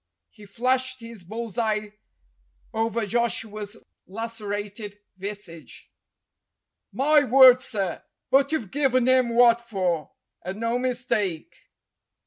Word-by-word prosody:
He 210 -2 -15
flashed 255 +4 0
his 230 -4 -11
bull's 220 +3 -6
eye 215 -2 -1 0.8
over 225 0 -1
Joshua's 215 -1 -2 0.3
lacerated 205 -1 -6 0.2
visage. 190 -4 -9 1.0
"My 295 +2 +4
word, 255 -1 +7
sir, 195 -8 -3 0.3
but 275 +2 +4
you've 240 -12 -2
given 265 -3 +2
him 255 -2 +4
what 235 -1 +6
for, 185 -8 -2 0.3
and 190 +3 -6
no 230 +2 0
mistake 240 -9 -2
230 Hz, 105 wpm, -25 LUFS, 205-250 Hz, 1.0 s, word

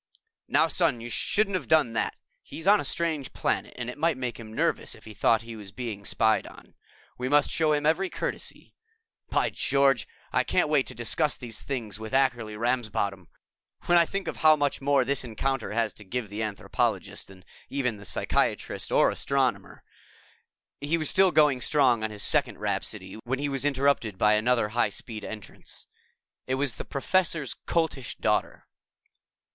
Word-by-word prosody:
"Now, - - +4
Son, 160 -9 +2
you 120 +1 -7
shouldn't 200 - 0
have 185 - -2
done 150 -7 +3
that. 115 - -1 0.3
He's 160 - -8
on 205 +1 +6
a - - -2
strange 160 -5 -1
planet - - -1
and 120 -1 -4
it 125 +4 -7
might 165 -3 +2
make 125 -2 -4
him 110 -1 -9
nervous 110 - -1
if - - -17
he 110 - -9
thought 115 +2 +2
he 115 0 -8
was 105 -3 -9
being 110 -4 -6
spied 110 +1 +2
on. - - -15 0.5
We 125 +1 -2
must 145 0 +3
show 155 -2 +2
him 150 0 0
every 180 +5 +2
courtesy. - - -5 0.6
By - - +1
George, 135 -4 +2 0.3
I - - +3
can't - - +1
wait 145 -3 +2
to - - -8
discuss 125 +5 0
these 120 -3 -5
things 115 -7 -5
with 110 +2 -7
Ackerly 120 -5 +1
Ramsbottom! 110 -6 -1 0.6
When 175 - +3
I 170 - +3
think 195 0 -4
of - - -4
how 155 -1 +6
much 145 -2 -1
more 140 -1 +3
this 140 0 0
encounter 130 +2 -2
has 115 0 0
to 105 - -12
give 105 +1 -4
the 105 +2 -4
anthropologist 105 -2 -2
than 95 -1 -15 0.3
even 125 -5 -1
the 100 - -12
physicist - - -1
or - - +4
astronomer - - -1 0.5
..." - - -43
He 150 +4 +1
was 155 -2 +1
still 190 -1 +5
going 150 -5 +4
strong 125 -6 +3
on 110 - -1
his 105 -1 -3
second - - +3
rhapsody - - -3
when 130 +3 -1
he 145 +1 -2
was 135 0 -2
interrupted 140 -7 +1
by 105 +2 +4
another 110 0 +2
high 120 +3 +1
speed 110 -3 -8
entrance. 105 -3 -9 0.6
It 130 - 0
was 135 -3 -1
the - - -6
Professor's 165 -1 0
Coltish 160 -7 -1
Daughter. - - -1
125 Hz, 180 wpm, -27 LUFS, 110-145 Hz, 0.6 s, on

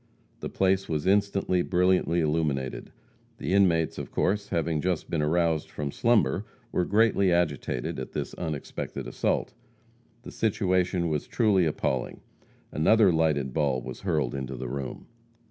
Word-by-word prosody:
The - - -5
place 95 0 +1
was 75 -2 -1
instantly 100 -2 +2
brilliantly 90 -2 +2
illuminated. 75 -5 -1 0.5
The - - -2
inmates 85 -5 +3
of - - -6
course, 100 +2 0
having 80 -3 0
just 90 -1 -2
been 80 - 0
aroused 80 0 +1
from 70 -2 -4
slumber, 110 - +2 0.3
were 90 - +1
greatly 105 -3 +3
agitated 75 -7 -1
at - - -7
this - - -4
unexpected 75 -5 -5
assault. - - -1 0.7
The - - -9
situation 90 -4 0
was 75 -3 -2
truly 100 -7 +2
appalling. 65 -4 -2 0.5
Another 100 +5 +4
lighted 75 -5 +1
ball 70 -5 +1
was - - -8
hurled 75 -10 -1
into 65 -1 -4
the 65 +1 -5
room. 70 0 -5
85 Hz, 140 wpm, -27 LUFS, 75-95 Hz, 0.7 s, Another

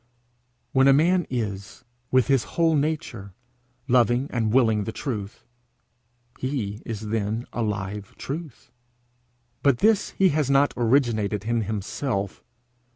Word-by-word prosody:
When 135 0 +4
a 135 - +7
man 175 +2 +3
is, 100 -6 -4 0.3
with 130 -2 +4
his 135 -1 +2
whole 165 -1 +4
nature, 140 - -2 0.5
loving 125 +1 +2
and 115 -3 0
willing 110 -4 +3
the 110 - -3
truth, 110 -5 -5 1.0
he 115 -6 -3
is 110 -2 -5
then 110 +2 -1
a 120 - -2
live 105 -2 -4
truth. 150 -2 -7 0.9
But 140 -3 +3
this 210 - +3
he 190 -1 +5
has 150 -3 0
not 140 +1 +3
originated 115 -5 +1
in 115 0 +1
himself. 105 0 -3
120 Hz, 125 wpm, -25 LUFS, 105-140 Hz, 1.0 s, a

